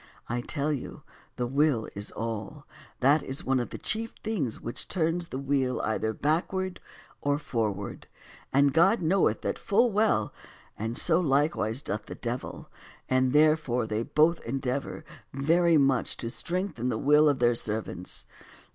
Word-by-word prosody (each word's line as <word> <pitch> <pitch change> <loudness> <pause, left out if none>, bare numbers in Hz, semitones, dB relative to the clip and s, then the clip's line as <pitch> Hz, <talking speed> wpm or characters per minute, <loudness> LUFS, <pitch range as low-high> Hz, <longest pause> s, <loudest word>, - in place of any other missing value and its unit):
I 120 +1 -2
tell 145 +4 -1
you 135 - -6 0.3
the 125 - -1
will 135 -2 +1
is 100 +1 -3
all; 115 +6 -5 0.4
that 145 +4 +5
is 135 +6 -4
one 135 0 +2
of 120 - -3
the - - -6
chief 225 +1 -2
things 180 - -2
which 120 - -6
turns 170 0 0
the 130 - -5
wheel 135 -2 0
either 110 0 -1
backward 180 - -1 0.4
or 145 0 +1
forward; 110 -8 -3 0.4
and 140 0 +4
God 180 +5 +4
knoweth 185 +5 +2
that - - -2
full 230 +4 +3
well, 205 - +2 0.4
and 115 +3 -4
so 165 0 +3
likewise 140 -5 +1
doth 105 0 -4
the - - -7
devil, 120 +1 -5 0.4
and 130 0 +3
therefore 150 -5 +3
they 110 0 -2
both 155 +6 +3
endeavor 135 +2 -3 0.3
very 165 +4 +3
much 135 -3 +2
to 115 - -4
strengthen 170 - -2
the 115 - -1
will 150 +4 +5
of 145 - +1
their 120 -1 +3
servants. 110 -5 -3
140 Hz, 155 wpm, -28 LUFS, 120-160 Hz, 0.4 s, that